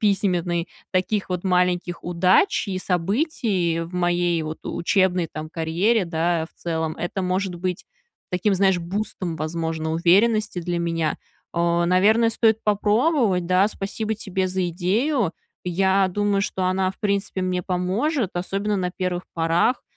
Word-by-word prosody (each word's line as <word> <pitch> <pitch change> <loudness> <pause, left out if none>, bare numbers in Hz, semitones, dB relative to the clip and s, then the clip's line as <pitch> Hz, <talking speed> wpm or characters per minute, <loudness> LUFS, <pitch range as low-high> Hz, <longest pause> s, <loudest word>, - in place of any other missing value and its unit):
письменный 180 -4 +1 0.2
таких 195 +2 0
вот 180 -1 -3
маленьких 180 -1 +1
удач 180 - +2
и 190 -2 -2
событий 185 - 0
в 165 +1 -6
моей 175 -1 +1
вот 155 0 -5
учебной 180 -1 +1
там 155 0 -6
карьере, 175 +7 +1
да, 165 -1 0
в - - -31
целом, 160 -2 -2
это 175 +2 -3
может 185 0 -1
быть 180 +1 -3 0.5
таким, 190 +3 +2
знаешь, 190 -1 +3
бустом, 175 -1 -4
возможно, 160 0 -3
уверенности 200 +4 +3
для 175 0 -2
меня. 165 -2 -1 0.4
Э, 170 0 +2
наверно, 215 +6 +4
стоит 225 -1 +2
попробовать, 210 - +2
да. 185 +3 +3
Спасибо 215 +2 -3
тебе 190 -3 -2
за 185 -1 -1
идею. 200 - 0 0.3
Я 190 +2 +2
думаю, 205 +1 0
что 190 -2 -2
она, 185 0 +1
в 195 - -15
принципе, 200 -2 -1
мне 180 -1 -1
поможет, 195 - 0
особенно 200 +3 -1
на 180 -2 -1
1 180 -1 -3
порах. 170 +9 +1
185 Hz, 140 wpm, -23 LUFS, 170-200 Hz, 0.5 s, наверно